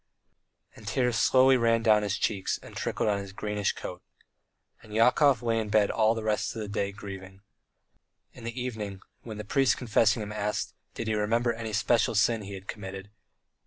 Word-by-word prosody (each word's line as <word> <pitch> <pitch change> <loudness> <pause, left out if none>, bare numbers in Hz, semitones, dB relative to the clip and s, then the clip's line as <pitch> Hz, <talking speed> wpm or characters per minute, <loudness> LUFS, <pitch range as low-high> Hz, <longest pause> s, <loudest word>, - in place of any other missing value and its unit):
and 105 - -13
tears 125 +1 +1
slowly 130 +4 +5
ran 115 -2 +2
down 110 -2 +5
his 105 -1 -1
cheeks 100 -4 -1
and - - -12
trickled - - -2
on 100 -1 +1
his 100 -1 -7
greenish 105 0 -2
coat. - - -7 0.8
And 105 -1 -10
Yakov 125 +2 +4
lay 115 -1 +1
in 110 -1 -3
bed 105 -1 +3
all 110 0 +3
the 110 - -4
rest 110 +1 -1
of - - -5
the - - -6
day 100 -1 -2
grieving. 95 -1 -9 0.9
In 120 - -13
the 115 +2 -5
evening, 105 -6 -5 0.2
when 110 -3 -8
the 105 - -5
priest 135 +5 +2
confessing 110 -2 +2
him 105 - -7
asked, 105 0 -2 0.2
Did 115 - -4
he 110 - 0
remember 115 +3 +1
any 115 -1 -5
special 115 +2 +2
sin 110 +2 +3
he 100 0 -7
had 95 +1 -11
committed? 95 -1 -7
110 Hz, 190 wpm, -28 LUFS, 105-115 Hz, 0.9 s, slowly